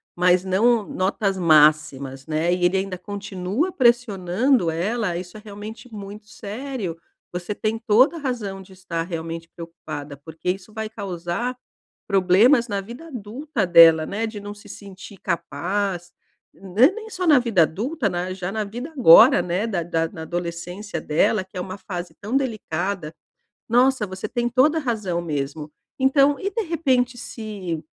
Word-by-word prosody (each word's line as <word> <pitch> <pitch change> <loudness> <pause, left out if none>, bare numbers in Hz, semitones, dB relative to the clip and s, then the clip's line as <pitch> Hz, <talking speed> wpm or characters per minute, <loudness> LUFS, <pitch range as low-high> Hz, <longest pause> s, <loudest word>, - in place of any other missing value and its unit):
mas 180 +1 +3
não 220 +5 +3
notas 195 +1 -1
máximas, 150 -5 +3
né. 160 +3 +1
E 180 0 -2
ele 180 +2 +2
ainda 190 -1 -3
continua 200 - -3
pressionando 235 - +2
ela, 180 +3 -1
isso 180 +3 -8
é - - -11
realmente 215 +4 -9
muito 205 0 -9
sério, 220 -3 -5 0.4
você 180 +3 -4
tem 220 +1 -2
toda 240 +8 +4
a - - -6
razão 230 -9 -4
de 190 0 -15
estar 185 -3 -4
realmente 165 -1 -5
preocupada, 155 -4 -8
porque 160 +5 -4
isso 195 +3 -8
vai 220 0 -4
causar 200 +3 -4 0.5
problemas 210 +7 +4
na 200 -1 -1
vida 240 +11 -10
adulta 245 -1 -3
dela, 165 -2 +7
né. 220 +3 -2
De 215 -2 -7
não 205 0 -7
se 205 0 -16
sentir 195 0 -11
capaz, 175 +3 -2 0.4
ne 200 - +3
nem 440 +2 -9
só 365 -3 -3
na 300 -4 +7
vida 225 -9 +3
adulta, 220 - -2
né, 180 0 -3
já 185 -1 -4
na 215 +1 -2
vida 240 +9 -7
agora, 225 - +8
né, 180 +5 -1
da 195 -7 -1
da 165 -1 -1
na 160 - -9
adolescência 175 +2 -5
dela, 185 +6 +1
que 185 -1 -10
é - - -2
uma 185 +1 -6
fase 180 -3 -7
tão 210 +5 -5
delicada. 200 - -2 0.5
Nossa, 250 -1 +3
você 185 +2 -6
tem 240 0 -1
toda 265 +6 +3
a - - 0
razão 215 - -2
mesmo. 150 -1 -4 0.3
Então 275 +2 +4
e 395 - -2
de 455 - -1
repente 260 -7 +1
se, 200 -9 -6
195 Hz, 160 wpm, -23 LUFS, 175-235 Hz, 0.5 s, agora